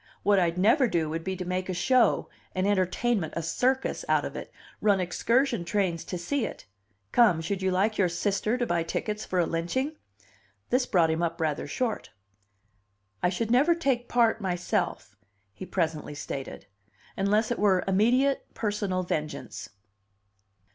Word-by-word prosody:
What 200 -1 +4
I'd 170 -1 +1
never 230 - +4
do 165 -6 0
would 165 +1 -3
be 190 +1 -3
to 180 - -5
make 185 +1 -2
a 185 - -2
show, 250 +7 +3 0.3
an 185 +1 0
entertainment, 200 -1 +1
a 165 - -2
circus, 255 - 0
out - - +3
of - - -6
it, - - -7 0.3
run 205 -2 +3
excursion 235 +5 +1
trains 170 -2 -1
to 180 - -4
see 260 +10 -1
it - - -6 0.5
come, 220 -9 +5
should 190 +4 -3
you 190 - +1
like 200 +4 +1
your 185 -3 +3
sister 200 +6 0
to 245 - 0
buy 175 -6 0
tickets 210 +6 -3
for 185 - -3
a 175 - +3
lynching?" 260 - -2 0.8
This 250 0 +2
brought 170 -4 +3
him 160 +1 -1
up 170 0 -1
rather 155 -3 -1
short. 230 - -2 1.1
"I 180 - +3
should 225 +5 -2
never 290 +8 +4
take 265 -7 -1
part 230 -2 +3
myself," 180 - -2 0.4
he 185 - -9
presently 160 -4 -2
stated, 135 -6 -6 0.5
"unless 210 +4 +1
it 240 - -1
were 190 -3 +3
immediate 245 +8 +2
personal 205 -4 -1
vengeance." 155 -3 -4
190 Hz, 160 wpm, -27 LUFS, 175-235 Hz, 1.1 s, come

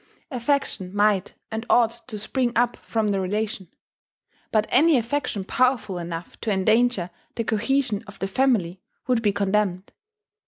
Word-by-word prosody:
Affection 240 -7 -1
might 205 -2 +2 0.2
and 220 0 -3
ought 235 -2 +5 0.2
to 220 -4 -5
spring 240 +3 -1
up 240 +1 +2
from 220 -2 -1
the 200 -1 +1
relation. 200 0 -2 0.8
But 215 -1 +3
any 320 -1 +5
affection 240 -3 -1
powerful 225 -4 +1
enough 170 0 -7
to 225 - -2
endanger 210 -1 +2 0.2
the 230 - -1
cohesion 225 0 0
of 200 -1 -11
the 195 - -2
family 195 -5 +1 0.2
would 250 -3 +2
be 210 -2 +2
condemned. 200 -1 0
215 Hz, 145 wpm, -24 LUFS, 195-245 Hz, 0.8 s, ought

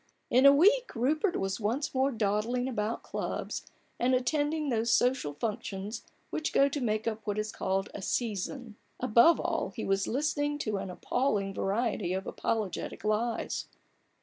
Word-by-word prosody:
In 260 +3 +7
a - - +10
week 420 - +4
Rupert 305 - +1
was 195 +2 -2
once 235 +8 -1
more 265 +1 +2
dawdling 225 +3 0
about 225 -3 -2
clubs, - - -4 0.3
and 255 +2 +3
attending 295 +4 0
those 230 -1 0
social 245 - +2
functions 210 +2 -4 0.3
which 315 - -2
go 275 - +5
to 280 0 -3
make 215 -1 0
up 220 -1 -2
what 205 0 -1
is 215 0 -2
called 195 +1 -1
"a - - -6
Season." 225 +2 -3 0.2
Above 250 +7 +5
all, - - -1
he - - -4
was 195 0 +1
listening 290 +2 0
to 215 -8 -2
an 195 -1 -4
appalling 200 +1 -1
variety 200 -2 -1
of 190 +1 -3
apologetic 215 -5 -3
lies. 220 +2 -1
230 Hz, 155 wpm, -30 LUFS, 210-270 Hz, 0.3 s, a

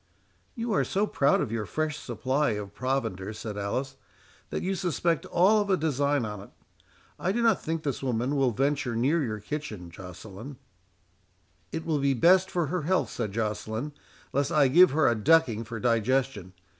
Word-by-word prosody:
"You 230 -2 -2
are - - +3
so 200 +2 0
proud 140 -8 +2
of - - -2
your 110 -3 -2
fresh 155 - -2
supply 130 +3 0
of 105 -1 -6
provender," 115 -7 -2
said 105 -1 -6
Alice, 130 +7 -3 0.5
"that - - -3
you 190 - 0
suspect 170 -3 -1
all 205 +5 +4
of 205 - -3
a 190 - +3
design 145 -4 +1
on't. 105 -1 -7 0.7
I 185 - 0
do 235 +3 0
not 225 -5 +3
think 160 0 -3
this 140 -6 -2
woman 125 +1 -1
will 135 -2 +3
venture 135 +1 0
near 145 +8 +2
your 110 -4 -3
kitchen, 105 - -6
Joceline." 95 - -10 1.1
"It 160 0 -4
will 155 -3 0
be 140 -1 +2
best 185 +8 +5
for 175 -2 0
her 175 +4 -2
health," 185 +5 0
said 110 -4 -3
Joceline, 110 +4 -3 0.4
"lest 140 0 +1
I 145 -3 +4
give 180 +7 +7
her 155 +1 +2
a 120 - +4
ducking 120 -1 +3
for 115 0 -6
digestion. 115 -3 0
135 Hz, 175 wpm, -27 LUFS, 110-160 Hz, 1.1 s, give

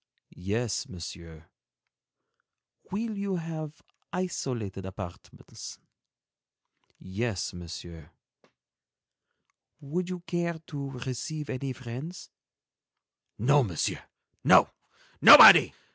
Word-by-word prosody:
"Yes, 105 +4 -3
Monsieur." 85 -2 -10 1.4
"Will 220 +2 -3
you 200 -1 -3
have 160 -3 -6 0.3
isolated 125 - -4
apartments?" 95 -2 -10 1.2
"Yes, 100 +1 -4
Monsieur." 85 -2 -10 1.7
"Would 175 +6 -4
you 180 -1 -5
care 170 -1 -3
to 140 -2 -6 0.2
receive 145 +4 -5
any 130 +1 -4
friends?" 130 +8 -9 1.1
"No, 140 +5 +3
Monsieur, 90 -9 -3 0.4
no, - - +5 0.5
nobody. - - +10
130 Hz, 75 wpm, -27 LUFS, -, 1.7 s, nobody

